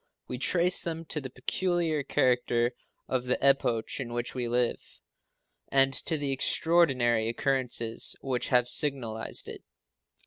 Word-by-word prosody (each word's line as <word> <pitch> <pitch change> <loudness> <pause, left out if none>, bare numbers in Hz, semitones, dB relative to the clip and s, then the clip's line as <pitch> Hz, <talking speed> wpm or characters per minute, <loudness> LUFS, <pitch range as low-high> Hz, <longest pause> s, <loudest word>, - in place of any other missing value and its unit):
We 125 - -5
trace 180 +5 +2
them 165 -1 -5
to 150 - -2
the 130 - -7
peculiar 165 +4 -1
character 125 -3 +1 0.4
of 130 -1 -2
the 125 - 0
epoch 135 -5 +1
in 120 -3 -5
which 120 0 -4
we 125 -2 -3
live, 120 0 0 0.8
and 135 0 +3
to 160 +3 0
the 145 -2 -2
extraordinary 130 -6 +2
occurrences 120 -2 0
which 130 -2 -2
have 125 -2 +3
signalized 125 -5 0
it. - - -8
130 Hz, 135 wpm, -28 LUFS, 120-145 Hz, 0.8 s, and